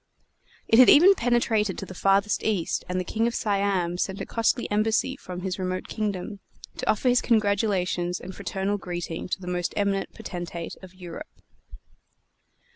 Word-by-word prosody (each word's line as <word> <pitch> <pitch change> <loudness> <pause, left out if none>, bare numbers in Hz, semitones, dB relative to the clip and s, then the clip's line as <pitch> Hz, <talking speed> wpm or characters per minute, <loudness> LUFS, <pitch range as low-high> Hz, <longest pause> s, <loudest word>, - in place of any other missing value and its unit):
It 225 - +5
had 255 - +9
even 360 +7 +8
penetrated 230 - +1
to - - -5
the 185 - -9
farthest 195 +2 +2
East; 200 -7 -1
and 180 0 -1
the - - -1
King 225 +4 0
of 235 - -2
Siam 195 -4 0
sent 190 +1 -2
a - - -4
costly 230 +1 0
embassy 220 +5 +1
from 180 -8 -8
his 190 0 -3
remote 185 0 -3
kingdom, 205 -1 -3 0.4
to - - -3
offer 215 +4 +1
his 245 0 +4
congratulations 200 -5 +1
and 190 - -8
fraternal 200 +1 -2
greeting 175 -3 -5
to - - -2
the 185 - -10
most 180 -1 -2
eminent 200 -1 0
potentate 175 -2 -6
of 185 -1 -13
Europe. 185 - -10
195 Hz, 165 wpm, -26 LUFS, 180-220 Hz, 0.4 s, had